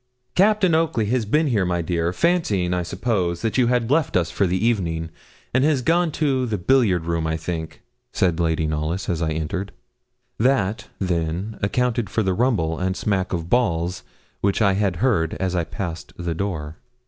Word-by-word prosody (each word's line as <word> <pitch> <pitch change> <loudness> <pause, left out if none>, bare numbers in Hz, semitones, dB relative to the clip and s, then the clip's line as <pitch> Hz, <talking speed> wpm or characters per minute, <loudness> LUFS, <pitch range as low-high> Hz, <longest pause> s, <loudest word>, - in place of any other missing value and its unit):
'Captain 200 -2 +4
Oakley 160 -9 +2
has 120 +1 0
been 150 +8 +3
here, 115 -9 +1
my 90 -1 0
dear, 85 0 -1
and 90 - -2
fancying, 110 - +1
I 90 - 0
suppose, 90 -1 -1
that 115 +3 0
you 125 - +4
had 125 0 +1
left 150 - +2
us 85 -2 0
for 100 - +1
the 90 +1 0
evening, 85 -7 0 0.4
has 135 +1 +2
gone 170 +2 +2
to 135 -5 +1
the 110 -2 -1
billiard 100 -5 +2
room, 85 -1 -1
I 80 0 -1
think,' 80 0 -5 0.3
said 85 -2 +1
Lady 80 -1 +1
Knollys, 80 +4 -2
as 85 -2 -1
I 80 - 0
entered. 80 +5 -3 0.7
That, 110 -4 +1
then, 90 +3 -2
accounted 120 +1 0
for 110 - 0
the 95 -1 +1
rumble 90 -8 +1
and 95 +1 -1
smack 95 -2 -1
of 85 -2 -2
balls 90 -6 +1 0.4
which 100 -1 +1
I 100 -3 +4
had 95 -2 0
heard 85 -11 +1
as 95 -1 -2
I 85 -2 0
passed 85 -2 -6
the 85 -1 -2
door. 80 -4 -4
95 Hz, 185 wpm, -22 LUFS, 85-120 Hz, 0.7 s, Captain